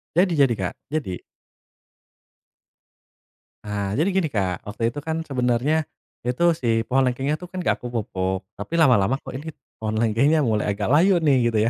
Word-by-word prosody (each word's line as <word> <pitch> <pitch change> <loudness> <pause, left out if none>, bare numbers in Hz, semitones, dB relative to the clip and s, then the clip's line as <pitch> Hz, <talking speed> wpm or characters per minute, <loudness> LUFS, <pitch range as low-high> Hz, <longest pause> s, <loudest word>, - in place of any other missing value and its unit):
Jadi 180 +1 +4
jadi, 135 -4 +5
Kak, 95 -4 -3
jadi. 145 - -3 2.4
Ah, 100 -1 -3
jadi 160 +8 +2
gini, 190 -3 +1
Kak. 95 - -2
Waktu 115 +2 -1
itu 145 - -6
kan 160 +2 -3
sebenarnya 135 +3 0 0.4
itu 125 +7 0
si 115 -6 +1
pohon 135 +1 +3
lengkengnya 135 +4 0
tuh, 180 - -8
kan 185 +1 -5
nggak - - +1
aku 125 - -6
pupuk. 95 -4 -2 0.2
Tapi 100 +11 -7
lama-lama 125 -8 +4
kok - - -8
ini 155 +3 -7 0.3
pohon 110 0 -2
lengkengnya 130 +8 +3
mulai 105 -4 +1
agak 100 - -3
layu 175 +4 +4
nih, 145 -4 +4
gitu 110 - +1
125 Hz, 165 wpm, -23 LUFS, 110-155 Hz, 2.4 s, jadi